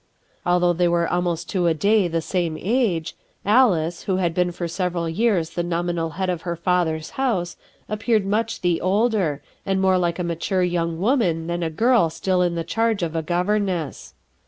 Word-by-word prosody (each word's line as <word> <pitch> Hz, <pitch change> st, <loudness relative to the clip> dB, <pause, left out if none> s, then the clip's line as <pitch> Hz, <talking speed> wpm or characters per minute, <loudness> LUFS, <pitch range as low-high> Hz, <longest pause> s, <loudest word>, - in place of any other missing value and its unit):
Although 175 Hz, 0 st, +3 dB
they 175 Hz, +1 st, +2 dB
were 170 Hz, -1 st, +1 dB
almost 175 Hz, -2 st, -1 dB
to 180 Hz, -4 st, +1 dB
a 165 Hz, -, +2 dB
day 205 Hz, +3 st, +3 dB
of -, -, -8 dB
the 165 Hz, 0 st, 0 dB
same 170 Hz, -4 st, -1 dB
age, 200 Hz, -7 st, 0 dB, 0.3 s
Alice, 185 Hz, -7 st, +3 dB
who 190 Hz, -, 0 dB
had 175 Hz, -3 st, 0 dB
been 180 Hz, 0 st, +1 dB
for 175 Hz, 0 st, -4 dB
several 175 Hz, -1 st, -2 dB
years 175 Hz, -2 st, +1 dB
the 175 Hz, -, -2 dB
nominal 170 Hz, -1 st, -1 dB
head 190 Hz, -1 st, -1 dB
of 175 Hz, -2 st, -2 dB
her 170 Hz, -1 st, -3 dB
father's 170 Hz, -2 st, 0 dB
house, 190 Hz, -10 st, 0 dB, 0.3 s
appeared 215 Hz, -1 st, 0 dB
much 225 Hz, +3 st, -1 dB
the 175 Hz, -2 st, +1 dB
older, 195 Hz, -6 st, +1 dB, 0.2 s
and 195 Hz, -1 st, 0 dB
more 190 Hz, -1 st, +3 dB
like 170 Hz, -1 st, 0 dB
a 180 Hz, -, -2 dB
mature 170 Hz, +2 st, -1 dB
young 170 Hz, -2 st, -1 dB
woman 185 Hz, -, +1 dB
than 170 Hz, +1 st, -3 dB
a 165 Hz, -, 0 dB
girl 225 Hz, +2 st, +3 dB
still 180 Hz, +3 st, 0 dB
in 175 Hz, -1 st, +1 dB
the 165 Hz, -, -2 dB
charge 225 Hz, 0 st, 0 dB
of 165 Hz, -1 st, -3 dB
a 165 Hz, -, 0 dB
governess. 180 Hz, -2 st, -1 dB
175 Hz, 190 wpm, -22 LUFS, 170-195 Hz, 0.3 s, Although